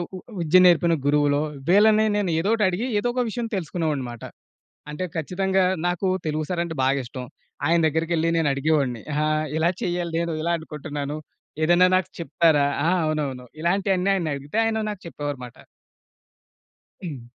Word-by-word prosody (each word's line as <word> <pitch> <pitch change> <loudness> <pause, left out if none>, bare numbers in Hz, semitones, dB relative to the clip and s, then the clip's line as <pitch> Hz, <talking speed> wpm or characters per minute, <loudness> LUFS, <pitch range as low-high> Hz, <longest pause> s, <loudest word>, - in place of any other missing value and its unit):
ఉ - - -6 0.2
విద్య 170 +2 +4
నేర్పిన 170 -1 +5
గురువులో, 145 0 +3 0.3
వీళ్ళని 215 +3 +5
నేనొదోటి 205 +3 +1
అడిగి, 195 +7 -2
ఏదోక 245 +3 -1
విషయం 235 +1 -3
తెలుసుకునేవాడ్నిమాట. 150 -9 -3 0.7
అంటే 150 +5 -4
ఖచ్చితంగా, 190 +4 0 0.2
నాకూ 175 +2 0 0.2
తెలుగు 155 0 -1
సారంటే 170 -2 -2
బాగిష్టం. 130 -1 -1 0.4
ఆయన 170 +2 +3
దెగ్గరికెళ్లి 160 +1 0
నేనడిగేవాడ్ని. 140 -5 +1
అహా! 150 +1 +1 0.3
ఇలా 160 +2 +2
చెయ్యాలి 175 -1 -2
నేను, 170 0 -1
ఇలా 170 +1 0
అనుకుంటున్నాను. 150 -2 -5 0.5
ఏదైనా 175 +3 +5
నాకు 185 - 0
చెప్తారా 160 -3 +2 0.2
ఆ! - - +3 0.2
అవునవును. 145 -5 -2
ఇలాంటియన్నీ 190 +2 +1
ఆయన్నడిగితే, 150 -1 -3
ఆయన 220 -1 0
నాకు 205 -3 -7
చెప్పేవారుమాట. 145 -6 -6 1.5
హ్మ్. 145 -8 -6
165 Hz, 125 wpm, -24 LUFS, 145-185 Hz, 1.5 s, నేర్పిన